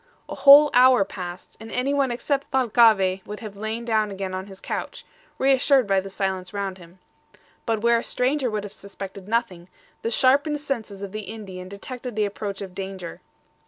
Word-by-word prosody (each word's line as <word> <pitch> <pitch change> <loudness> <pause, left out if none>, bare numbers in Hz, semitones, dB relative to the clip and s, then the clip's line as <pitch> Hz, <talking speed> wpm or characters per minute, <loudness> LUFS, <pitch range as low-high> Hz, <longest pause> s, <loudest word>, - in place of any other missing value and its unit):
A - - -6
whole 290 +1 +8
hour 250 -4 +6
passed, 180 -2 -8
and 225 0 -10
anyone 275 +2 +1
except 275 +3 -2
Thalcave 220 -7 +3
would 210 0 -6
have 215 -3 -8
lain 220 +3 -4
down 220 -2 +1
again 195 -1 -5
on 185 +1 -5
his 190 -1 -12
couch, - - -5 0.3
reassured 270 -1 +3
by 195 -1 +2
the 195 +1 -6
silence 190 -1 -3
round 195 -2 -3
him. 175 +1 -16 0.7
But 225 -2 0
where 235 0 +4
a - - -6
stranger 260 +1 0
would 210 -2 -3
have 205 - -8
suspected 195 -1 -9
nothing, 210 -6 -2 0.3
the 230 - -2
sharpened 280 +5 +2
senses 220 -9 -4
of 195 - -6
the 215 -1 -6
Indian 190 -4 -8
detected 245 +4 -7
the 215 -1 +1
approach 200 0 -5
of 190 -2 -9
danger. 190 -2 -7
210 Hz, 180 wpm, -24 LUFS, 195-250 Hz, 0.7 s, whole